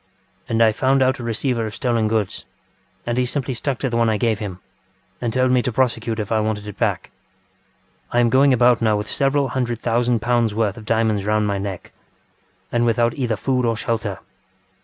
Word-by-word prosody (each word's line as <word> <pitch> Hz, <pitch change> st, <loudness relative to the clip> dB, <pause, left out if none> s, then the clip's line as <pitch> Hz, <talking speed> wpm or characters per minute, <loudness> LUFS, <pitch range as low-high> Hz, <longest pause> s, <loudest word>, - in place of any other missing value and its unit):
And 115 Hz, 0 st, +3 dB
I 110 Hz, -, +5 dB
found 130 Hz, +4 st, +2 dB
out 130 Hz, 0 st, +1 dB
a -, -, -6 dB
receiver 115 Hz, 0 st, -1 dB
of 110 Hz, -, -8 dB
stolen 115 Hz, -3 st, 0 dB
goods, 110 Hz, -3 st, -1 dB, 0.6 s
and 120 Hz, +1 st, -1 dB
he 125 Hz, -, +2 dB
simply 135 Hz, 0 st, -2 dB
stuck 130 Hz, +2 st, -2 dB
to 135 Hz, -, -2 dB
the 115 Hz, -, 0 dB
one 115 Hz, -1 st, +3 dB
I 110 Hz, -, +1 dB
gave 110 Hz, -2 st, 0 dB
him 95 Hz, -4 st, -6 dB, 0.6 s
and 120 Hz, -, -1 dB
told 130 Hz, +1 st, +2 dB
me 125 Hz, -1 st, +4 dB
to 125 Hz, -, -2 dB
prosecute 115 Hz, -2 st, 0 dB
if 105 Hz, 0 st, -4 dB
I 110 Hz, -, +2 dB
wanted 105 Hz, -1 st, -2 dB
it 105 Hz, -, -9 dB
back. -, -, -1 dB, 1.0 s
I 120 Hz, -, +2 dB
am 120 Hz, -1 st, +3 dB
going 135 Hz, +1 st, +5 dB
about 125 Hz, -1 st, +4 dB
now 110 Hz, -2 st, +2 dB
with 105 Hz, +1 st, -4 dB
several 140 Hz, 0 st, +1 dB
hundred 120 Hz, -3 st, -2 dB
thousand 120 Hz, 0 st, +1 dB
pounds 120 Hz, -2 st, +1 dB
worth 105 Hz, -3 st, 0 dB
of 110 Hz, -, -10 dB
diamonds 110 Hz, -2 st, +1 dB
round 105 Hz, +1 st, +1 dB
my 100 Hz, -1 st, -1 dB
neck, 95 Hz, -2 st, -6 dB, 0.8 s
and 120 Hz, 0 st, +1 dB
without 120 Hz, 0 st, +2 dB
either 120 Hz, -5 st, -1 dB
food 125 Hz, +4 st, 0 dB
or 115 Hz, -2 st, 0 dB
shelter. 110 Hz, -3 st, -2 dB
115 Hz, 205 wpm, -21 LUFS, 110-125 Hz, 1.0 s, I